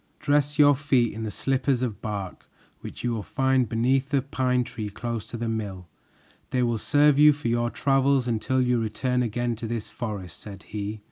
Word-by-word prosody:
"Dress 145 0 +1
your 145 -1 +7
feet 130 -4 +1
in 110 - -6
the - - -3
slippers 130 +2 0
of 115 -5 -3
bark 100 -4 -6 0.3
which - - -9
you 120 - 0
will 115 -2 -2
find 130 +1 +1
beneath 130 +4 +1
a 135 - +2
pine 130 -2 0
tree 115 -4 -6
close 115 +1 -5
to 120 - -6
the 115 0 -3
mill. 100 -5 -4 0.6
They 125 -1 +1
will 120 -2 0
serve 145 +4 +4
you 150 0 +8
for 145 -4 -4
your 120 0 +1
travels 135 0 +2
until 120 +3 0
you 125 -1 +2
return 125 +4 -1
again 120 0 -1
to 115 - -5
this 115 -1 -4
forest," 100 -8 -6
said 100 -3 -10
he. 105 0 -5
120 Hz, 195 wpm, -25 LUFS, 110-135 Hz, 0.6 s, you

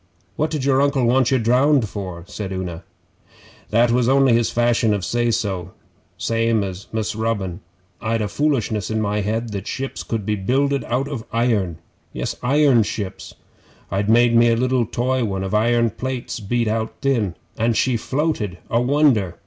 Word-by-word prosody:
'What 155 +1 0
did 150 -4 -3
your 135 -1 +3
Uncle 140 -3 +2
want 125 +1 +3
you 135 - +3
drowned 125 +2 +3
for?' 95 -4 -6
said 100 0 -6
Una. 90 -3 -5 0.9
'That 115 +2 +3
was 120 0 +2
only 135 -2 +4
his 115 0 +2
fashion 120 -2 +2
of 100 - -3
say 120 0 0
so, 95 -6 -2 0.4
same 115 +3 +1
as 95 0 -6
Mus' 110 -1 -2
Robin. 105 -6 -2 0.4
I'd 115 +1 0
a - - -1
foolishness 115 -5 0
in 110 0 -1
my 105 0 0
head 110 +3 -2
that 100 -1 -5
ships 135 0 -4
could 110 -4 -3
be 105 - 0
builded 135 +8 0
out 130 +3 -1
of 135 -6 -5
iron. 110 -8 0 0.4
Yes - - -3
iron 135 -1 +4
ships! 100 -2 -5 0.6
I'd 100 +3 0
made 120 +1 +5
me 120 0 +6
a 115 - +3
liddle 125 -1 +1
toy 125 +2 0
one 95 -3 -2
of 95 - -4
iron 115 +1 +2
plates 130 +1 -4
beat 115 +2 -1
out 110 +1 -1
thin 115 -10 +1 0.2
and 115 0 +1
she 130 +2 +2
floated 125 - -1
a 115 - +3
wonder! 125 - +2
115 Hz, 175 wpm, -21 LUFS, 105-130 Hz, 0.9 s, me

